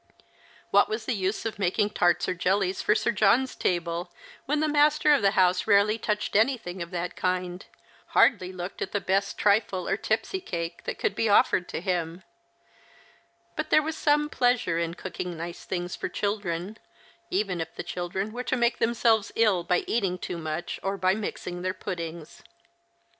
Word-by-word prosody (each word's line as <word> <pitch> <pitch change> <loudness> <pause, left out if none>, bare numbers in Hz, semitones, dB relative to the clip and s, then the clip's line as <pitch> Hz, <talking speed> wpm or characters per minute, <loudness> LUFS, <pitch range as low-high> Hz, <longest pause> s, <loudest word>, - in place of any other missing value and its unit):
What 200 - +5
was 220 +1 -3
the 250 - 0
use 195 +1 -2
of 220 -2 -4
making 205 +2 +1
tarts 175 -4 +2
or - - 0
jellies 185 +1 0
for 210 - +3
8ir 235 - +1
John's 225 +6 +3
table, 175 0 -1 0.4
when 295 +2 +1
the 310 - +2
master 300 0 +4
of 280 - +3
the 200 - +4
house 185 +1 +3
rarely 210 +2 +4
touched 210 -2 -2
anything 215 -6 +1
of 170 - -5
that 175 0 -4
kind, 180 0 -2 0.4
hardly 185 -8 +3
looked 180 0 -7
at - - -3
the 205 - +1
best 195 +1 0
trifle 200 -3 +2
or - - +1
tipsy 220 - -1
cake 170 - -5
that - - -3
could - - 0
be 225 +2 0
offered 185 -3 +3
to - - -4
him; 175 -1 -2 1.3
but - - -3
there 310 - +5
was 315 +1 -3
some 295 -1 +2
pleasure 245 - +1
in 170 0 -2
cooking 180 -2 -5
nice 170 +1 -7
things 175 -1 -3
for - - -4
children, 200 0 -3 0.5
even 195 - -1
if 165 - -6
the - - -5
children 180 +4 -3
were 245 +2 -4
to 255 +1 -1
make 240 0 +1
themselves 225 -2 +2
ill 210 -6 +3
by 180 +1 +1
eating 195 -6 0
too 180 -1 -5
much 160 +2 -4
or 195 +1 -2
by 185 0 +2
mixing 180 -4 -5
their 185 +1 -2
jjuddings. 170 -4 -6
190 Hz, 180 wpm, -27 LUFS, 175-220 Hz, 1.3 s, What